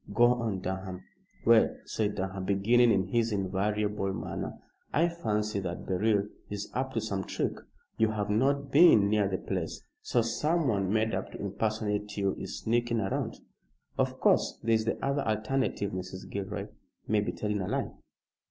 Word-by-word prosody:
Go 120 +1 +6
on, 115 -6 -2
Durham." 95 0 -4 0.4
"Well," 115 -1 +5
said 105 -2 -1
Durham, 95 -1 -3
beginning 115 +5 +4
in 95 -3 +1
his 115 +1 +1
invariable 100 +1 0
manner, 95 - -4 0.3
"I 165 +3 +3
fancy 105 -10 -1
that 90 -2 -4
Beryl 100 +2 +1 0.2
is 105 0 -5
up 130 +1 -2
to 115 - +1
some 100 -3 -2
trick. - - -1 0.5
You 110 -1 +4
have 105 -1 -2
not 140 +5 +1
been 140 - +7
near 105 -2 +3
the 95 -1 -1
place; 90 -4 -4 0.2
so 120 - +1
someone 115 - +1
made 110 +1 +1
up - - -3
to - - -8
impersonate 105 0 -2
you 100 -1 +1
is - - -6
sneaking 120 +1 +1
round. 95 -3 -2 0.5
Of - - 0
course, - - +3
there 115 0 +2
is 110 -1 +2
the 115 - 0
other 140 +1 +1
alternative, 110 -2 0
Mrs. 95 0 -6
Gilroy 100 -1 -4 0.4
may 105 0 +3
be 105 - -1
telling 105 -1 -2
a 90 - -3
lie!" - - -1
105 Hz, 165 wpm, -29 LUFS, 100-115 Hz, 0.5 s, been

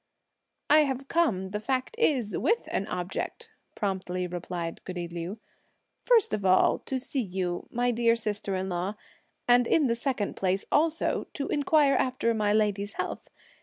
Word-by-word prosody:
"I've 275 -3 +3
come, 205 - +1
the 210 - -2
fact 255 - -2
is, 255 - +2
with 460 +1 +1
an 195 - -1
object!" 180 -1 -4 0.2
promptly 185 -3 -2
replied 175 -1 -5
goody 180 -2 -5
Liu; 170 +4 -5 0.6
"(first 465 - +3
of 210 -2 -1
all) 185 -1 +4
to 265 - -1
see 265 +1 -2
you, 180 -4 -3
my 245 +1 +1
dear 230 0 +3
sister 210 -3 -2
in 185 0 -2
law; 185 +3 -2 0.5
and, 245 0 +5
in 310 - +3
the 235 - +2
second 235 -3 -2
place 190 0 0
also, 320 +2 +1
to 280 - -3
inquire 290 -1 +3
after 250 -2 +1
my 210 -2 +1
lady's 205 -1 +1
health. - - -5
215 Hz, 155 wpm, -28 LUFS, 185-265 Hz, 0.6 s, and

